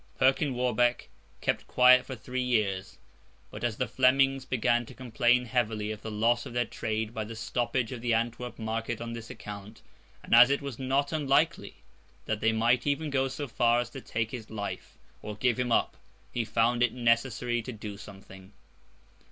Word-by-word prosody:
Perkin 135 +1 +2
Warbeck 120 -1 +1 0.3
kept - - -1
quiet 125 0 +6
for 130 - -5
three 125 +2 -4
years; 105 -6 -1 0.5
but, - - -8
as 115 -3 -1
the 130 - -1
Flemings 135 +1 +3
began 120 -1 +1
to - - -12
complain 125 0 +2
heavily 110 -3 -1
of 105 -1 -7
the 110 - -6
loss 115 +4 +1
of 125 - -9
their 120 0 +1
trade 110 0 -3
by 110 -2 -3
the 110 +2 -8
stoppage 120 +2 -2
of 125 -3 -6
the 120 0 -1
Antwerp 120 +2 -1
market 115 +1 -3
on 115 0 -5
his 115 -1 -8
account, 105 0 -9 0.4
and - - -3
as 120 +2 +9
it 140 - +2
was 140 -4 -7
not 135 +2 0
unlikely 150 -5 0 0.4
that 110 -1 -2
they 115 +1 +2
might 120 +3 +2
even 145 +1 0
go 135 -1 +1
so 140 +2 -5
far 120 0 +2
as 120 0 -3
to 135 - -8
take 110 -2 -3
his 115 -4 -7
life, 105 -2 -6 0.2
or 105 - -6
give 125 +2 +1
him 125 -1 -1
up, - - +2 0.4
he 120 - 0
found 115 +2 +1
it 120 -2 +3
necessary 120 0 +1
to 125 - -7
do 105 -2 -7
something. 95 -1 -13
120 Hz, 185 wpm, -29 LUFS, 110-125 Hz, 0.5 s, as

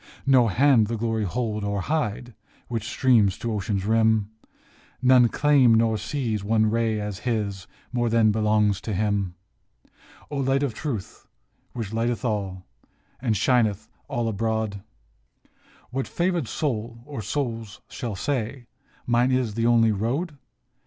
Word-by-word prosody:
" - - -27
No 130 -3 +5
hand 120 +1 +4
the 115 +1 -2
glory 110 -1 -1
hold 105 +1 -2
or 100 -1 -1
hide 125 -4 -2 0.4
Which 115 -2 -3
streams 110 -7 +3
to 115 -1 -3
ocean's 100 -1 -2
rim, 110 -1 +2 0.7
None 125 -2 +5
claim 130 -6 +4
or 115 -1 +2
seize 110 -4 -2
one 110 +1 +2
ray 115 -1 +1
as 105 -2 -4
his 105 -5 -2 0.3
More 120 -1 +1
than 115 -1 +4
belongs 105 -2 +2
to 110 - -3
him. 100 -3 0 1.0
O 145 - -3
Light 135 +1 +1
of 135 -5 -1
Truth, 120 -10 -5 0.5
which 110 -4 -5
lighteneth 120 +2 -1
all, 95 -5 -2 0.6
And 115 -5 +1
shineth 110 -3 +1 0.2
all 120 -1 -2
abroad, 110 -1 -2 1.1
What 130 +1 -2
favored 175 -6 -1
soul 115 -5 -3
or 140 -5 -6
souls 115 -2 -3
shall 115 -4 -5
say, 125 +1 -3 0.2
" - - -34
Mine 120 +2 +2
is 130 -4 0
the 115 +2 0
only 115 -2 +4
road? 130 - -2
115 Hz, 145 wpm, -25 LUFS, 105-125 Hz, 1.1 s, No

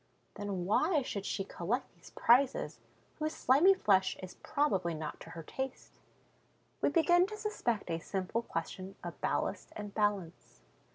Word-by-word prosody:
Then 200 -3 -3
why 300 - +3
should 200 -5 -4
she 195 - -1
collect 200 +7 -3
these - - -16
prizes, 275 - +3 0.4
whose 310 0 -1
slimy 315 +10 +5
flesh 190 - +3
is 185 - -7
probably 195 - +1
not 155 -1 -5
to 165 - -11
her 165 0 -8
taste? 265 - -6 0.8
We - - +4
begin 350 +2 +4
to 425 +1 -7
suspect 415 - -1
a 165 - -1
simple 190 +6 -2
question 185 -1 -5
of - - -7
ballast - - -1
and 205 -1 -6
balance. 190 - -1
210 Hz, 150 wpm, -33 LUFS, 185-290 Hz, 0.8 s, slimy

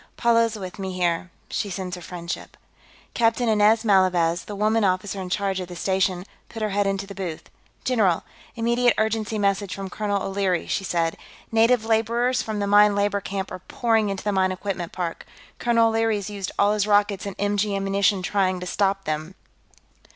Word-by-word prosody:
"Paula 230 -1 +4
is 225 -1 -4
with 190 -1 -8
me, 190 -1 -4
here; 175 0 0 0.2
she 205 - -3
sends 185 -1 -4
her 180 - -10
friendship." 170 -1 -7 0.6
Captain 230 +1 +2
Inez 220 +1 +4
Malavez, 180 -4 +3
the 205 - -6
woman 215 +2 +2
officer 190 +1 0
in 185 - -6
charge 195 0 -1
of 180 - -5
the 175 - -9
station, 190 0 0 0.2
put 225 -2 -5
her 215 - -1
head 200 0 +1
into 195 0 -1
the 200 - -9
booth. 180 -5 -6 0.3
"General! 210 -9 +2 0.3
Immediate 235 +1 +2
urgency 220 0 0
message 200 -1 0
from 195 -1 -6
Colonel 205 -1 -1
O'Leary," 195 -3 0
she 195 - -2
said. 165 -3 -1 0.3
"Native 225 +1 +3
laborers 235 +3 +1
from 220 -1 -4
the 205 - 0
mine 205 0 +5
labor 200 0 +1
camp 195 0 -4
are - - -6
pouring 225 +2 0
into 195 -1 -4
the 210 - 0
mine 190 -1 +2
equipment 185 -2 -4
park. 175 -2 -4 0.4
Colonel 230 -1 +3
O'Leary's 225 -2 0
used 200 -2 -4
all 205 +1 +4
his 210 -1 0
rockets 205 -1 +2
and 195 - -6
MG 205 0 0
ammunition 195 0 +1
trying 185 -1 +1
to 180 - -6
stop 195 +1 0
them." 155 +4 -3
200 Hz, 185 wpm, -24 LUFS, 185-215 Hz, 0.6 s, mine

